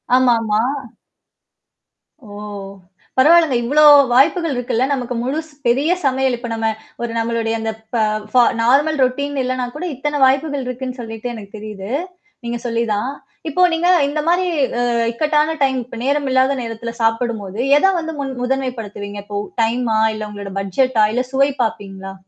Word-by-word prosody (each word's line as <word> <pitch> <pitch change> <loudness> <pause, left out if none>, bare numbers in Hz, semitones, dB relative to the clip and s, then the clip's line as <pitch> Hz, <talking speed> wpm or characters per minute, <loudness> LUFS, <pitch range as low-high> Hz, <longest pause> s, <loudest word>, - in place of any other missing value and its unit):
ஆமாமா. 230 -4 +3 1.6
ஓ! - - -17 0.9
பரவாலங்க. 320 0 +5
இவ்வளோ 290 +6 +3 0.3
வாய்ப்புகள் 310 +4 +3
இருக்குல்ல. 245 0 0
நமக்கு 250 -2 -3
முழு 275 +5 -1 0.3
பெரிய 275 +7 +2
சமையல் 265 -1 +2
இப்ப 240 +1 -7
நம்ம 225 0 -1 0.3
ஒரு 240 -1 -2
நம்மளுடைய 230 0 -1
அந்த 225 0 -2 0.2
ப - - +1 0.4
ஃப 250 -1 +6 0.2
நார்மல் 290 +6 +3
ரொட்டீன் 280 +3 -1
இல்லனா 255 0 -1
கூட 340 +4 -4
இத்தன 295 +3 -2
வாய்ப்புகள் 275 +1 +1
இருக்குன்னு 255 0 -5
சொல்லிட்டு 225 +1 -6
எனக்கு 205 -3 -10
தெரியுது. 210 -1 -7 0.5
நீங்க 235 0 -2
சொல்லிதான். 230 +1 -1 0.4
இப்போ 360 - 0
நீங்க 330 +2 +1 0.2
இந்த 300 +2 -2
மாரி 355 +2 +3 0.3
அ - - +1 0.3
இக்கட்டான 300 +5 +1
டைம் 265 -1 +2
இப்ப 250 - -10
நேரம் 285 +1 +1
இல்லாத 260 +1 +3
நேரத்தில 230 0 -5
சாப்பிடும்போது, 225 -3 -1 0.2
எதை 385 +6 +4
வந்து 320 -1 -5
முன் 270 -1 -3
முதன்மைப்படுத்துவீங்க? 230 -6 -3
இப்போ 205 0 -5 0.3
டைமா 230 0 0 0.2
இல்ல 215 0 -5
உங்களோட 200 -2 -7
பட்ஜெட்டா? 215 +4 +2
இல்ல 250 +2 +1
சுவை 275 +1 +3
பார்ப்பீங்களா? 195 -3 -5
250 Hz, 145 wpm, -19 LUFS, 225-275 Hz, 1.6 s, ஃப